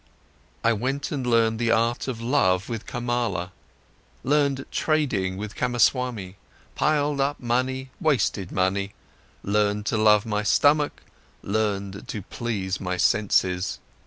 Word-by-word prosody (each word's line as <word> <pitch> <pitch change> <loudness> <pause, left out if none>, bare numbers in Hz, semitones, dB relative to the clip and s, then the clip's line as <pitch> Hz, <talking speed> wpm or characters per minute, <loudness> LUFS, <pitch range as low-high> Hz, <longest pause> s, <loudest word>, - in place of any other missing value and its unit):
I 115 - +4
went 135 +6 -2
and 135 -4 -2
learned 115 -2 +3
the 120 -1 +1
art 115 +3 +1
of 125 -4 -3
love 100 -6 +1
with 115 -3 -5
Kamala, 120 -7 -2 0.7
learned 140 -1 +1
trading 115 -13 0
with 105 +1 -6
Kamaswami, 120 -5 0 0.4
piled 145 -2 +1
up 140 +2 0
money, 130 +2 -1
wasted 120 - 0
money, 95 +2 0 0.5
learned 105 0 +1
to 110 - 0
love 105 0 +5
my 105 -2 -1
stomach, 145 +8 +2 0.4
learned 100 -2 -2
to 105 - -5
please 100 -5 -3
my 90 -1 -2
senses. 90 -1 +1
115 Hz, 125 wpm, -25 LUFS, 100-130 Hz, 0.7 s, love